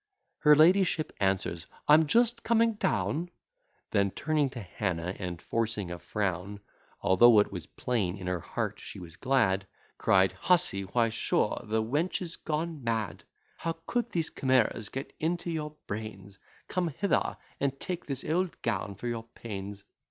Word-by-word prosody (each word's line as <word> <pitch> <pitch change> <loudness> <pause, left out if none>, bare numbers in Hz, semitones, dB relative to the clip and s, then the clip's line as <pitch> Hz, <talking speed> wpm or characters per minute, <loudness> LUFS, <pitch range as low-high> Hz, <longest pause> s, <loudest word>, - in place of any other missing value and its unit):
Her 150 -1 +7
ladyship 165 0 +4
answers, 95 -4 0 0.2
"I'm 155 +1 +7
just 235 +5 +3
coming 230 0 +3
down:" 150 - 0 0.6
Then, 100 -2 +3
turning 150 +5 0
to 130 -2 -7
Hannah, 90 -3 -3
and 90 -4 -4
forcing 110 -5 -1
a 85 - -5
frown, 95 +2 -2 0.4
Although 110 +5 +6
it 105 - +2
was 90 -5 -6
plain 105 -7 -1
in 95 - -8
her 90 -1 -1
heart - - -3
she - - -9
was 85 -3 -10
glad, 110 -8 +2 0.3
Cried, 95 0 +4
"Hussey, 125 - +2
why 115 +4 +2
sure 115 - 0
the 110 +1 0
wench 145 +11 0
is 170 -3 -3
gone 155 -2 -3
mad! 110 -7 -2 0.3
How 165 0 -2
could 240 -1 -1
these 165 -6 -1
chimeras 130 -5 +1
get 135 +2 -6
into 170 +2 -1
your 150 -2 -4
brains! 100 -2 -6 0.3
Come 180 -1 0
hither 190 +6 0 0.2
and 135 -1 -1
take 180 -1 -5
this 135 -2 -2
old 175 +3 -1
gown 100 -1 -1
for 100 - -9
your 115 -1 -2
pains. 100 -2 -6
115 Hz, 155 wpm, -29 LUFS, 100-160 Hz, 0.6 s, Her